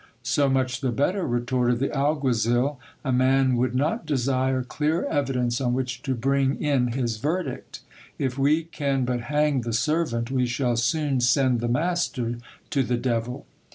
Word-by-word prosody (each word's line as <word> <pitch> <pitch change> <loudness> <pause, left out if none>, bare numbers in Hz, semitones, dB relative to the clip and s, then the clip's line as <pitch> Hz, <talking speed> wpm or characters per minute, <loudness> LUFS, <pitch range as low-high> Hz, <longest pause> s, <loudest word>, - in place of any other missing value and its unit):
So 140 -1 +2
much 130 -1 0
the 130 -3 0
better, 180 - 0
retorted 120 0 +1
the 135 +3 -2
alguazil; 135 -2 +1 0.3
a 130 - 0
man 130 +1 +3
would 125 +1 0
not 145 +7 0
desire 130 -2 +1
clearer 155 +6 -1
evidence 125 -3 0
on 125 -1 +1
which 125 -1 -3
to 135 -2 -2
bring 135 +2 +1
in 130 -5 +1
his 120 -3 -1
verdict. 160 +10 -3 0.4
If 130 -2 -1
we 145 +4 +2
can 140 -5 -1
but 125 -1 -1
hang 150 +1 +1
the 115 -1 -4
servant, 120 -2 0
we 130 -2 +1
shall 120 0 0
soon 140 +3 +1
send 125 0 +3
the 120 - -1
master 125 -4 -1 0.3
to 140 - +2
the 125 -1 0
devil. 120 0 -2
130 Hz, 160 wpm, -25 LUFS, 120-140 Hz, 0.4 s, man